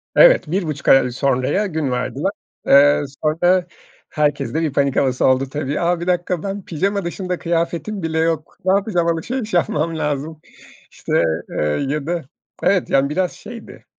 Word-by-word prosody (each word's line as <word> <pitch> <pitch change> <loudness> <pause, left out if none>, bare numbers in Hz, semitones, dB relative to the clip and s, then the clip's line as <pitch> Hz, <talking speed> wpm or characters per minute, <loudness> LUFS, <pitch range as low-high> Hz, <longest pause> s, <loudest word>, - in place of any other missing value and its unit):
Evet, - - +6
1,5 160 -6 -2
ay 135 -2 +5
sonraya 130 - 0
gün 155 -6 -2
verdiler. 130 +8 -2 0.4
Eee, 145 +1 +6 0.2
sonra 175 +4 +2 0.4
herkeste 150 +1 0
bir 155 -4 -1
panik 140 -2 +1
havası 130 -2 +1
oldu 130 +1 +2
tabii. 145 0 -2
A, 175 0 +1
1 170 - -5
dakika 180 -1 0
ben 200 -1 -5
pijama 195 +4 -1
dışında 180 +1 -3
kıyafetim 170 +4 -2
bile 160 0 -1
yok. 160 -1 -1
Ne 190 - +4
yapacağım? 195 -4 +1
Alışveriş 215 +8 -2
yapmam 165 -2 0
lazım. 150 +1 -3 0.5
İşte, - - 0 0.3
eee, - - -2 0.2
ya 150 0 -2
da 175 0 -1 0.4
Evet, 190 -2 +2
yani 135 +1 +2
biraz 180 +4 0
şeydi, 230 +2 -11
165 Hz, 155 wpm, -20 LUFS, 145-180 Hz, 0.5 s, Evet